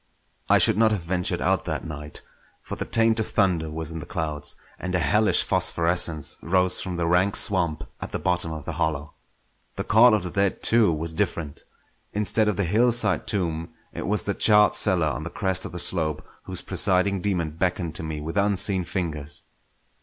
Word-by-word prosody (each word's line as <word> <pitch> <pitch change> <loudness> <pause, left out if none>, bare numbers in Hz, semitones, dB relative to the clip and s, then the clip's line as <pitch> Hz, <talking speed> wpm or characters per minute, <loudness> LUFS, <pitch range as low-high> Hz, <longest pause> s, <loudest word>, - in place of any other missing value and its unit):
I - - +6
should - - +5
not 115 -1 +5
have 105 -5 -2
ventured 90 +1 -1
out - - 0
that - - -4
night; 75 -1 -8 0.4
for - - -6
the - - -4
taint 115 0 +2
of 110 - -1
thunder 90 -6 +1
was 80 0 -5
in 80 - -6
the - - -9
clouds, 75 -2 -2 0.2
and 90 0 -3
a - - +4
hellish 105 +7 +3
phosphorescence 85 -3 +1
rose 90 +1 +2
from 95 -2 -5
the 85 - -1
rank 90 +4 +2
swamp 85 -6 +2 0.2
at - - -6
the - - -2
bottom 90 -2 0
of 80 -2 -7
the - - -4
hollow. 75 -2 -3 0.6
The - - -3
call 110 +2 +5
of 105 - -2
the 90 - -5
dead, 100 0 -1
too, 115 -5 +3
was 80 +1 -3
different. 85 -6 -3 0.5
Instead 105 +1 +1
of 105 -3 0
the 100 - +1
hillside 115 +6 +1
tomb, 85 -5 -3 0.2
it - - -5
was 105 +1 -1
the 100 - -2
charred 105 -1 +4
cellar 90 -6 +2
on 75 - -2
the 85 - -5
crest 95 0 -2
of - - -7
the 90 - -7
slope 80 -3 -1 0.2
whose - - -6
presiding 95 0 +1
daemon 90 -5 -1
beckoned 85 0 -2
to 80 - -5
me 80 -2 -5
with 80 +5 -5
unseen 100 -1 +2
fingers. 80 -5 -5
90 Hz, 195 wpm, -24 LUFS, 80-100 Hz, 0.6 s, I